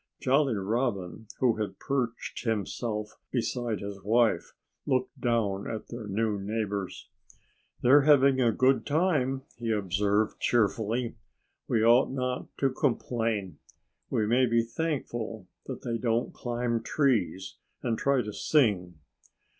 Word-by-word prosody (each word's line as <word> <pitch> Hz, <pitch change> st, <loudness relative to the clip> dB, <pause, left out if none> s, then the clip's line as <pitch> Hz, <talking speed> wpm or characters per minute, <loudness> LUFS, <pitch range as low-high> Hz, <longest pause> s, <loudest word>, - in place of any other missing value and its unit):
Jolly 135 Hz, -1 st, +2 dB
Robin, 105 Hz, -1 st, -2 dB
who 120 Hz, -4 st, +3 dB
had 105 Hz, -2 st, -3 dB
perched 125 Hz, -4 st, -3 dB
himself 105 Hz, -1 st, -3 dB
beside 120 Hz, -3 st, -2 dB
his 100 Hz, -1 st, -6 dB
wife, 115 Hz, +3 st, +2 dB, 0.3 s
looked 130 Hz, 0 st, -1 dB
down 110 Hz, -5 st, 0 dB
at 110 Hz, -2 st, -6 dB
their 120 Hz, -3 st, -6 dB
new 105 Hz, +1 st, 0 dB
neighbors. 100 Hz, -1 st, -3 dB, 0.8 s
"They're 140 Hz, +4 st, +7 dB
having 140 Hz, -2 st, +5 dB
a 120 Hz, -2 st, +4 dB
good 130 Hz, +4 st, +3 dB
time," 145 Hz, -5 st, +1 dB
he 115 Hz, -1 st, -4 dB
observed 105 Hz, +1 st, +1 dB
cheerfully. 115 Hz, +1 st, 0 dB, 0.5 s
"We 110 Hz, -2 st, +2 dB
ought 120 Hz, +3 st, +5 dB
not 125 Hz, -1 st, -2 dB
to 135 Hz, -1 st, +2 dB
complain. 115 Hz, -, -1 dB, 0.5 s
We 110 Hz, -, +1 dB
may 125 Hz, +4 st, +3 dB
be 115 Hz, 0 st, +3 dB
thankful 115 Hz, -, -3 dB, 0.2 s
that -, -, -6 dB
they 115 Hz, -1 st, -2 dB
don't 115 Hz, 0 st, 0 dB
climb 120 Hz, -1 st, -2 dB
trees 105 Hz, -, 0 dB, 0.3 s
and 115 Hz, -, 0 dB
try 135 Hz, +1 st, +1 dB
to 105 Hz, 0 st, -6 dB
sing." 100 Hz, -, +2 dB
115 Hz, 125 wpm, -28 LUFS, 105-130 Hz, 0.8 s, They're